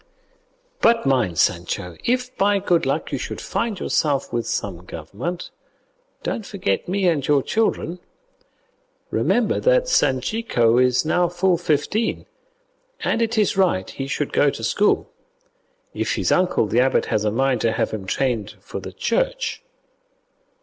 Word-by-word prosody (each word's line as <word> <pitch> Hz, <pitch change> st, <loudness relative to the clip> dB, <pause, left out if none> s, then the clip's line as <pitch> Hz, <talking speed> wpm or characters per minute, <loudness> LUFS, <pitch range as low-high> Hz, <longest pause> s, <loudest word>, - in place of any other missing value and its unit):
But 230 Hz, -5 st, +4 dB
mind, 125 Hz, -11 st, +1 dB
Sancho, 90 Hz, +1 st, 0 dB
if 250 Hz, +1 st, -1 dB
by 200 Hz, +1 st, +3 dB
good 175 Hz, -3 st, +1 dB
luck -, -, -1 dB
you -, -, -2 dB
should -, -, -5 dB
find 225 Hz, -5 st, -2 dB
yourself 145 Hz, -6 st, 0 dB
with 120 Hz, -1 st, -1 dB
some 90 Hz, -4 st, -3 dB
government, 100 Hz, -, -6 dB, 0.7 s
don't 225 Hz, -, -2 dB
forget 200 Hz, -1 st, -2 dB
me 190 Hz, +1 st, +1 dB
and 150 Hz, -6 st, +1 dB
your 145 Hz, -2 st, +3 dB
children. 195 Hz, -5 st, -1 dB, 1.1 s
Remember 235 Hz, -3 st, +1 dB
that -, -, +3 dB
Sanchico 130 Hz, -, +2 dB
is 125 Hz, +3 st, +3 dB
now 175 Hz, +2 st, +2 dB
full 175 Hz, +1 st, +1 dB
fifteen, 170 Hz, +7 st, 0 dB, 0.8 s
and 230 Hz, -, 0 dB
it 230 Hz, 0 st, 0 dB
is 210 Hz, -2 st, +2 dB
right 180 Hz, -, +2 dB
he 135 Hz, -, -5 dB
should 140 Hz, +1 st, -2 dB
go 145 Hz, -, +4 dB
to 115 Hz, -, -6 dB
school, 205 Hz, -, +1 dB, 0.8 s
if -, -, -1 dB
his -, -, 0 dB
uncle 180 Hz, -10 st, +2 dB
the 115 Hz, +3 st, +1 dB
abbot 130 Hz, +1 st, +3 dB
has 105 Hz, -, 0 dB
a 105 Hz, -, +2 dB
mind 130 Hz, +1 st, +1 dB
to 115 Hz, -, +2 dB
have -, -, -1 dB
him 100 Hz, -3 st, -5 dB
trained 115 Hz, -4 st, -1 dB
for -, -, -7 dB
the -, -, -8 dB
Church. -, -, -1 dB
155 Hz, 150 wpm, -22 LUFS, -, 1.1 s, But